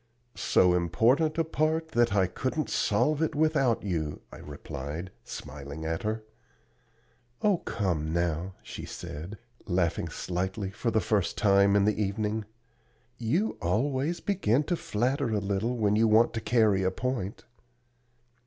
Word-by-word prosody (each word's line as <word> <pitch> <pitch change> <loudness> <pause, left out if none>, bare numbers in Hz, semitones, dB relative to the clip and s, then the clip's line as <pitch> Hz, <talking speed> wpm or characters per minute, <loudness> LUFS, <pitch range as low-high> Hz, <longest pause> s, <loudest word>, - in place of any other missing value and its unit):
"So 90 -1 +3
important 125 - +2
a 165 - +3
part 160 0 0
that 120 -5 +2
I 95 -2 +4
couldn't 130 - -2
solve 150 +9 +2
it 160 - 0
without 145 -6 +2
you," 80 -7 -2
I - - -10
replied, 75 +4 -7
smiling 75 +2 -7
at 80 0 -2
her. 110 +1 -2 1.2
"Oh, 205 -3 +4
come 85 -8 -2
now," 85 +2 -1
she - - -8
said, 85 +8 -7 0.3
laughing 90 -3 0
slightly 95 +2 -3
for 115 +4 -2
the 110 -1 +2
first 100 -5 0
time 100 -1 +4
in 100 -1 +4
the 105 0 +1
evening; 105 +2 -1 0.7
"you 160 - 0
always 130 - 0
begin 150 - +1
to 175 - 0
flatter 130 0 -1
a 110 - 0
little 100 +5 -1
when 105 -2 +2
you 110 +1 +4
want 110 +2 +4
to 115 - -3
carry 110 -5 +3
a 95 - +2
point." 115 -1 -3
105 Hz, 145 wpm, -28 LUFS, 95-130 Hz, 1.2 s, I